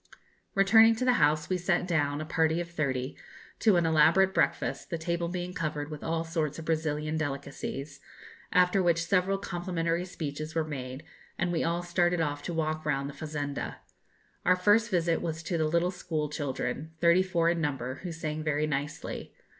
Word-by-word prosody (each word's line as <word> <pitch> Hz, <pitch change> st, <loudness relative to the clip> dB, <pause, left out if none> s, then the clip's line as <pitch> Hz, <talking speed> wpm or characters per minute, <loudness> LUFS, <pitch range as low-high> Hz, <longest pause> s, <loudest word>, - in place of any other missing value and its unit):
Returning 220 Hz, +3 st, +6 dB
to 255 Hz, -, -2 dB
the 250 Hz, -, +5 dB
house, 150 Hz, +1 st, +3 dB
we 185 Hz, -1 st, 0 dB
sat 175 Hz, 0 st, +1 dB
down, 145 Hz, -4 st, +1 dB
a -, -, -4 dB
party 160 Hz, +1 st, +1 dB
of 170 Hz, -1 st, -5 dB
thirty, 135 Hz, -5 st, -2 dB, 0.4 s
to 215 Hz, -4 st, +4 dB
an 170 Hz, -1 st, +3 dB
elaborate 165 Hz, +4 st, +5 dB
breakfast, -, -, 0 dB
the 170 Hz, -, -2 dB
table 170 Hz, +1 st, -1 dB
being 180 Hz, +1 st, -4 dB
covered 150 Hz, -2 st, -3 dB
with 150 Hz, -, -7 dB
all 165 Hz, 0 st, -1 dB
sorts 160 Hz, -3 st, -2 dB
of 165 Hz, -, -7 dB
Brazilian 155 Hz, -1 st, -1 dB
delicacies, 140 Hz, -1 st, -4 dB, 0.5 s
after 180 Hz, +1 st, +4 dB
which 170 Hz, -2 st, +2 dB
several 195 Hz, +1 st, +2 dB
complimentary 175 Hz, -3 st, -2 dB
speeches 155 Hz, -3 st, -5 dB
were 165 Hz, -, +2 dB
made, 130 Hz, -2 st, -6 dB, 0.3 s
and 175 Hz, 0 st, 0 dB
we 170 Hz, -, 0 dB
all 170 Hz, +1 st, 0 dB
started 175 Hz, 0 st, +1 dB
off 145 Hz, -2 st, -1 dB
to 160 Hz, -, -4 dB
walk 155 Hz, -1 st, -1 dB
round 140 Hz, -2 st, -1 dB
the -, -, -15 dB
fazenda. 145 Hz, -2 st, -4 dB, 0.7 s
Our 180 Hz, -, +5 dB
first 210 Hz, +5 st, +3 dB
visit 170 Hz, -4 st, +1 dB
was 160 Hz, 0 st, -3 dB
to 170 Hz, -, -2 dB
the 160 Hz, -2 st, +1 dB
little 170 Hz, +3 st, +1 dB
schoolchildren, 150 Hz, -2 st, -3 dB
thirty 170 Hz, +2 st, +5 dB
four 170 Hz, -3 st, +1 dB
in 170 Hz, -1 st, -1 dB
number, 135 Hz, -3 st, -2 dB
who 180 Hz, -, -5 dB
sang 155 Hz, -1 st, -4 dB
very 155 Hz, -1 st, 0 dB
nicely. 150 Hz, +2 st, -4 dB
165 Hz, 180 wpm, -29 LUFS, 150-175 Hz, 0.7 s, Returning